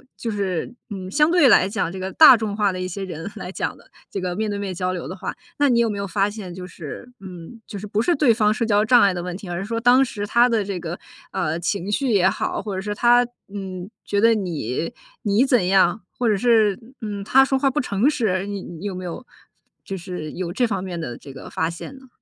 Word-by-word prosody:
就 235 - -4
是， 200 0 -2 0.2
嗯， 190 -2 -5
相 300 - +3
对 345 -5 +6
来 190 -6 +6
讲 195 -4 -2
这 190 - -7
个 190 +1 -4
大 285 -6 +9
众 215 -2 -3
化 205 -2 +2
的 185 - -5
一 185 - -2
些 195 +2 -5
人 175 0 -6
来 190 -3 -6
讲 - - -3
的， - - -21 0.2
这 195 - -3
个 180 -1 -2
面 215 +3 -1
对 205 -1 -3
面 200 -2 -3
交 180 +1 -1
流 180 - -5
的 185 - -6
话， 190 - -5 0.2
那 290 - +4
你 240 -3 +3
有 235 -1 +3
没 205 - -3
有 200 - -2
发 195 +2 +1
现 205 -4 -8
就 180 0 -8
是， 180 - -9
嗯， 185 +3 -10
就 200 - -7
是 210 - -7
不 205 +1 -1
是 345 +9 +2
对 275 -4 +4
方 215 -2 +3
社 225 - -2
交 210 -2 +3
障 240 +1 +6
碍 200 -3 +5
的 175 -1 -4
问 180 0 -4
题， 190 -1 -8
而 175 - -3
是 195 - -3
说 230 +2 -2
当 250 +3 +5
时 205 -4 -5
他 235 +3 +5
的 230 -4 +1
这 195 -2 -4
个， 170 +1 -5 0.3
呃， 170 -3 -1
情 190 +3 -2
绪 265 +5 0
也 190 -2 +4
好， - - -2
或 205 -3 -5
者 190 - -2
说 205 +1 -3
他， 240 +3 +4 0.3
嗯， 190 -2 -6 0.2
觉 200 0 0
得 230 +1 +5
你， 165 - -3 0.3
你 210 +2 +3
怎 250 -8 +3
样， 190 +1 +3
或 240 -2 0
者 210 - +2
是， 220 -3 +3 0.2
嗯， 205 -2 -4
他 265 +6 +5
说 270 0 +1
话 270 0 +2
不 295 - 0
诚 210 -1 +1
实， 205 -10 +1
你 200 -1 -4
你 170 +3 -9
有 200 - -2
没 185 0 -6
有 180 +8 -6 0.6
就 195 - -5
是 175 -4 -6
有 175 -1 -4
这 245 +5 +2
方 195 -4 -2
面 175 -3 -5
的 120 -7 -5
这 140 - -12
个 135 - -10
发 160 +1 -1
现 170 +10 -8
呢？ 265 0 -16
200 Hz, 280 characters per minute, -22 LUFS, 185-230 Hz, 0.6 s, 大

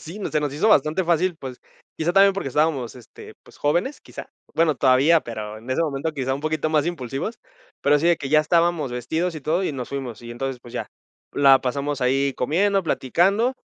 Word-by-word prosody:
sí, 170 +6 -9
se 150 - +1
nos 145 -2 -2
hizo 180 +9 0
bastante 160 -1 +3
fácil, 175 +1 +1
pues, 130 -4 -9 0.4
quizá 165 +2 0
también, 195 +1 +6
porque 190 -8 -4
estábamos, 140 -4 0
este, 120 - -13
pues - - -18
jóvenes, 175 - 0
quizás. - - -10 0.3
Bueno, 160 -2 +2
todavía 140 +5 +4
pero, 110 -2 -7
en 115 +3 -15
ese 130 - +1
momento 155 0 -2
quizá 130 -2 -2
un 140 - -6
poquito 155 0 -1
más 150 -1 +2
impulsivos, 155 - -4 0.4
pero 145 +1 +4
sí, 165 - 0
de 170 -1 +4
que 140 -1 -6
ya 155 - +6
estábamos 165 -2 +1
vestidos 160 +8 -2
y 155 - -8
todo, 170 +6 0
y 170 - -1
nos 130 -3 -6
fuimos. 130 -5 -6
Y 120 - -9
entonces, 130 +2 -4
pues 120 -1 -14
ya, - - -5 0.4
la 135 -2 +5
pasamos 140 +2 -2
ahí 135 +2 +1
comiendo, 195 +9 +1
platicando, 190 - +1
150 Hz, 205 wpm, -23 LUFS, 130-170 Hz, 0.4 s, también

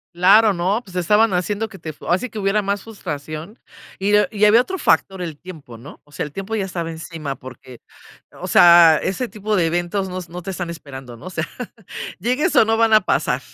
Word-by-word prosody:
Claro, 200 +4 +5
no, 190 +5 0
pues 190 -7 -15
estaban 210 +4 +3
haciendo 205 +5 -1
que 220 - -13
te 160 -3 -7
fue 150 - -14
así 185 +9 0
que 220 - -7
hubiera 200 +1 +1
más 200 0 -2
frustración, 155 - -7 0.4
y 200 +2 +2
ah 210 -2 +3
y 210 0 +2
había 220 +3 +6
otro 380 +9 -5
factor, 195 - +1
el 165 -4 -5
tiempo, 155 -9 -11
¿no?, 125 +6 -13
o 145 - -23
sea, - - -3
el 150 - -9
tiempo 195 +7 -5
ya 210 - -1
estaba 175 -3 -4
encima 160 -3 -6
porque, 130 -1 -13 0.5
o - - -8
sea, 170 -2 +7
ese 240 +7 -2
tipo 215 -1 -2
de 175 - +2
eventos 175 +4 -1
no 185 0 -5
s 170 -2 -11
no 180 +1 -7
te 195 +2 -6
están 175 -2 -5
esperando, 135 -7 -9
¿no?, 120 - -14
o - - -6
sea, 160 -2 -2 0.7
llegues 255 - 0
o - - +7
no, 225 +1 +1
van 225 0 +2
a 215 - +6
pasar, - - 0
185 Hz, 225 wpm, -20 LUFS, 165-210 Hz, 0.7 s, sea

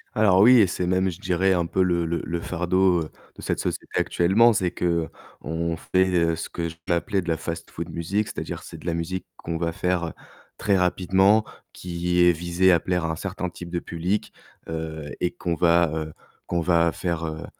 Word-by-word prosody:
Alors 100 -4 +5
oui 125 +4 +8
et 105 - +7
c'est 90 0 -2
même, 95 +1 +2
je 85 - -10
dirais, 95 0 +2
un 85 -2 0
peu 95 +3 +1
le 85 -2 +1
le 85 +1 -1
le 85 +2 -3
fardeau 90 0 +1
de 75 - -15
cette - - -2
société - - -3
actuellement. 105 +7 +4
C'est 90 -4 0
qu'on 85 -1 -3
fait 90 -2 +2
ce 80 - -6
que 85 -1 -3
je 80 - -8
peux 85 - 0
appeler 95 +3 0
de 85 - -11
la 80 - +1
«fast-food 85 0 -6
musique», 95 +6 -1
c'est-à-dire 100 - -6
c'est - - -10
de - - -11
la 85 - 0
musique 85 +3 -3
qu'on 85 0 -4
va 85 0 -1
faire 85 -1 -1 0.4
très 100 -2 +2
rapidement, 95 +4 +3 0.3
qui 90 0 -1
est 90 - +7
visée 85 +2 +2
à 85 - +5
plaire 90 -1 -1
à 80 - -1
un - - -2
certain 90 +2 -4
type 85 0 -9
de 85 - -3
public, 90 +5 -3 0.3
heu 80 -2 -5
et 90 - 0
qu'on 85 - -3
va, 85 -1 +3
heu, 80 -1 -4 0.3
qu'on 85 - 0
va 85 -1 +3
faire, 85 -3 -3
heu, 80 0 -5
85 Hz, 200 wpm, -24 LUFS, 85-95 Hz, 0.4 s, oui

